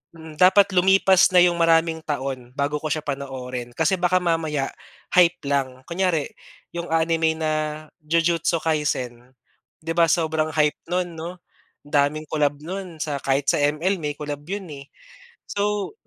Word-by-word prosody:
mm. 160 -2 -12
Dapat, 190 +2 +6
lumipas 190 0 +5
na - - +9
yung 175 -1 +2
maraming 165 -1 +3
taon 135 -4 -4
bago 145 +1 -1
ko 155 - -4
siya 155 +1 -2
panoorin. 130 -3 -5
Kasi 160 +4 +2
baka 180 +1 +3
mamaya, 160 -5 -1 0.4
hype 180 0 +5
lang, 135 -2 -1
kunyari 170 -4 0 0.4
yung 170 0 -4
anime 160 0 +1
na 155 -1 -1 0.5
Jujutsu 165 +1 +1
Kaisen, 130 -5 -2 0.5
'di 165 - -3
ba, 170 -1 +4
sobrang 160 -1 +1
hype 150 -1 +2
no'n 180 -1 -1
'no, 170 +3 -7 0.5
daming 145 +1 +1
collab 145 -2 +1
no'n 180 -1 -6
sa 145 -3 -3
kahit 140 +1 0
sa - - 0
ML, 155 +6 +1
may 150 -2 -3
collab 145 -1 -6
yun, 200 0 -4
eh. 140 - -13 0.6
So, 205 - -1
160 Hz, 150 wpm, -23 LUFS, 145-175 Hz, 0.6 s, na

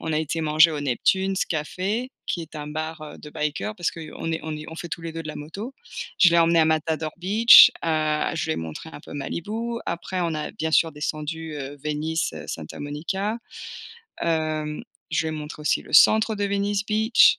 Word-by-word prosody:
on 160 - -3
a 155 - +2
été 160 +1 -2
manger 155 +1 +5
au 150 -2 -3
Neptune's 190 +9 +1
café 190 +10 -2 0.2
qui 175 - -2
est 160 - -12
un 150 - -6
bar, 155 +1 -4
heu, 150 - -9
de 150 - -10
biker 150 +9 -2
parce 175 -4 -1
qu'on 165 - -10 0.3
est 160 - -2
on 155 -1 -4
est 150 - -8
on 160 - -9
fait 170 - -6
tous 170 - -5
les 165 -1 -5
2 165 - -5
de - - -6
la - - -5
moto. 200 - -7 0.4
Je 175 - +7
l'ai 170 - +4
emmené 165 0 +5
à - - +5
Matador 160 0 0
Beach, 210 +6 +8
heu, 155 -1 +1
je - - -1
lui 160 - 0
ai - - -3
montré 80 - -6
un - - -9
peu - - -12
Malibu, 220 +11 -4
après, 180 +2 -3
on 170 -2 0
a, 150 0 -3
bien 160 -6 -3
sûr, 160 0 +3
descendu, 155 +2 -4
heu, 140 0 -6
Venice, 155 +2 -1
heu, - - -8
Santa 80 -2 -7
Monica. 190 +9 -3 0.8
Hem, 155 -2 -1 0.3
je 160 0 +1
lui 160 - -2
ai - - -5
montré 150 0 -8
aussi - - +2
le - - -14
centre 220 +6 +6
de 205 - -1
Venice 200 0 0
Beach, 220 +2 +5
160 Hz, 215 wpm, -24 LUFS, 150-190 Hz, 0.8 s, Beach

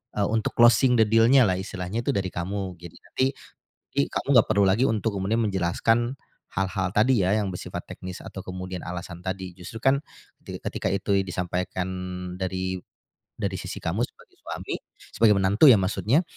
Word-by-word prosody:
eee, 100 -1 +1
untuk 110 0 0
closing 120 +2 +6
the 110 - +8
deal-nya 115 +4 +6
lah. 95 - +2
Istilahnya 95 +3 -4
itu - - +2
dari 95 -2 0
kamu, 95 +1 -4
gitu 85 -1 -10
jadi - - -16
nanti 130 - 0 0.9
kamu - - -3
enggak 115 - +6
perlu 100 -2 +4
lagi 105 +7 +3
untuk 110 -1 -1
kemudian 105 +5 0
menjelaskan 115 +7 +1 0.4
hal-hal 95 0 0
tadi 110 -1 +4
ya, 95 - +2
yang 105 -2 -1
bersifat 90 - -5
teknis 90 -1 -8
atau 95 - -7
kemudian 95 -1 -6
alasan 90 0 -6
tadi. 95 -1 -4
Justru 95 +5 -9
kan, 135 +1 +3 0.5
ti - - -6
ketika - - -3
itu 100 +1 +1
i 95 - +2
disampaikan 90 0 -2 0.5
dari 95 0 -2 0.6
dari - - -2
sisi - - -6
kamu - - -1
sebagai - - -22
suami, - - -5 0.4
sebagai 110 -1 +5
menantu 100 +8 +4
ya 115 - +7
maksudnya, 110 - +2
95 Hz, 170 wpm, -25 LUFS, 95-115 Hz, 0.9 s, the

